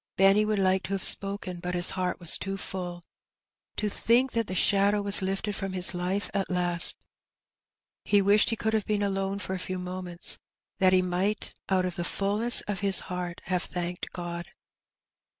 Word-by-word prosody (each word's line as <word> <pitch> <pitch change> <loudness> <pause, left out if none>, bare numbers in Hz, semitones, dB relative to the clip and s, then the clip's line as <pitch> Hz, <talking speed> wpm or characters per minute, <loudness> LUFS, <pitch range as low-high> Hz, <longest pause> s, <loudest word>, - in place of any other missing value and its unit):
Benny 195 +2 +4
would 215 0 -1
like 190 -1 +2
to 195 - -4
have 195 - -3
spoken^ 195 -3 +3
but 180 0 -4
his 175 0 +3
heart 185 -1 -3
was 170 -2 +4
too 195 0 -4
full 180 -3 -6 0.4
— - - -66
to 210 - -1
think 240 +5 +1
that 230 -2 -2
the 185 - -5
shadow 200 +2 +2
was 200 0 +5
lifted 195 +2 -3
from 195 -1 -5
his 185 0 +1
life 180 +2 -2
at 200 -2 -2
last! 175 -1 +2 1.1
He 205 - +3
wished 200 +2 +4
he 225 - 0
could 220 0 -2
have 220 -2 -1
been 210 -1 0
alone 195 0 -2
for 195 -2 -6
a 190 - -4
few 185 +1 -5
moments^ 180 -1 +1 0.4
that 185 -1 +4
he 185 0 +3
might 185 +4 -2 0.2
out 185 -1 +1
of 180 -1 -4
the 175 - -2
fulness 205 +6 +1
of 205 -2 -5
his 195 -1 +3
heart 180 -1 -5
have 180 -1 -2
thanked 175 -1 -5
God. 175 -1 -6
190 Hz, 190 wpm, -27 LUFS, 180-200 Hz, 1.1 s, was